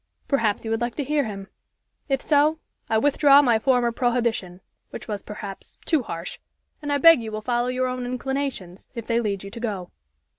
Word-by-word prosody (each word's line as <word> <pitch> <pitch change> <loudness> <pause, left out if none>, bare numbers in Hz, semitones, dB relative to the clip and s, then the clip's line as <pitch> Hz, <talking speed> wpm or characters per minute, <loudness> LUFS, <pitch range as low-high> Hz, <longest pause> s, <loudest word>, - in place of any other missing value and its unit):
Perhaps 230 -7 +1
you 220 - -3
would 225 +1 0
like 240 0 -2
to 290 - -2
hear 290 0 +1
him. 195 -3 -6 0.6
If 270 -1 0
so, 300 +1 +3 0.3
I 220 - +3
withdraw 285 +2 +5
my 235 -4 +3
former 245 -1 +2
prohibition, 235 -7 -1 0.3
which - - -9
was, 205 -3 -3
perhaps, 205 -2 -9
too 315 -5 +2
harsh, 170 -6 -6 0.4
and 290 -1 -3
I 285 - +3
beg 330 -1 +7
you 220 -1 -6
will 215 0 -4
follow 240 +1 0
your 255 +1 0
own 255 -1 -3
inclinations, 255 -7 -4
if 230 -2 -5
they 230 0 +1
lead 200 -4 -2
you 195 - -8
to 235 - -8
go." 200 -6 -4
240 Hz, 195 wpm, -24 LUFS, 215-270 Hz, 0.6 s, beg